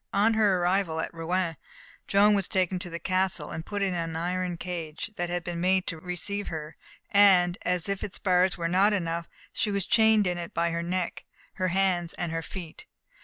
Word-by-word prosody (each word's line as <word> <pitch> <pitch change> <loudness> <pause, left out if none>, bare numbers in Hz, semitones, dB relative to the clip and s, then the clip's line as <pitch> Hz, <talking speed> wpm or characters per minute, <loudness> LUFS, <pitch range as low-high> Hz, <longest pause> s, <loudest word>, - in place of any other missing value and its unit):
On 210 +3 +4
her 210 -4 +3
arrival 175 -2 +1
at 160 - -3
Rouen, 165 0 -1 0.5
Joan 205 +1 +5
was 195 -3 +1
taken 185 -1 0
to 180 -1 -5
the 170 - -5
castle, 185 +1 0
and 160 - -5
put 205 +2 -3
into 185 -3 0
an 165 -1 -3
iron 180 +1 -2
cage 170 +1 -5
that 175 0 -2
had 175 0 -2
been 170 -1 -4
made 185 +1 +2
to 165 - -4
receive 185 +4 -4
her; 155 -1 -6 0.4
and, 185 -3 +6
as 180 -1 0
if 200 -1 -2
its 195 - -4
bars 180 -1 +2
were 170 -1 -1
not 195 +5 +3
enough, 170 -3 -2 0.2
she 215 - 0
was 200 -2 -1
chained 220 -2 +4
in 180 -1 -1
it 170 - -7
by 170 0 +1
her 170 0 -2
neck, 175 +1 -3 0.3
her 185 - -1
hands 180 -2 +1
and 175 -2 -3
her 165 0 -2
feet. 170 -1 -9
180 Hz, 205 wpm, -27 LUFS, 170-195 Hz, 0.5 s, and